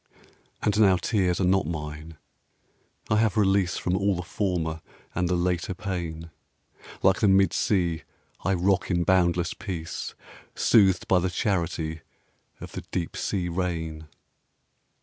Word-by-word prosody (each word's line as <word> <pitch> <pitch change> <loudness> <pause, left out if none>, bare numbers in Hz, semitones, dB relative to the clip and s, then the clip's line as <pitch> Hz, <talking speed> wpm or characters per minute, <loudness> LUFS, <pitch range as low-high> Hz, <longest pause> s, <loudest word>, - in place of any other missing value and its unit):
And 105 0 +1
now 95 -4 +6
tears 90 -3 0
are - - +1
not 95 -2 +2
mine. 75 0 -6 0.9
I 105 - +4
have 110 -2 +2
release 95 -2 +2
From 90 - -1
all 100 0 +1
the 90 - -4
former 85 -4 -2 0.3
and 90 -1 0
the 90 - +2
later 90 +2 -1
pain; 85 -5 -5 0.7
Like - - +4
the - - +3
mid 95 -2 +4
sea 85 -5 +1 0.4
I 95 +2 +2
rock 95 +2 +1
in 85 -2 +1
boundless 85 -1 +2
peace, 85 -5 -5 0.4
Soothed 95 -5 +4
by 95 - +4
the 90 +1 0
charity 85 -4 -1 0.6
of - - -9
the - - -6
deep 85 -3 -3
sea 90 -3 -1
rain.... 80 -3 -3
90 Hz, 140 wpm, -26 LUFS, 85-95 Hz, 0.9 s, now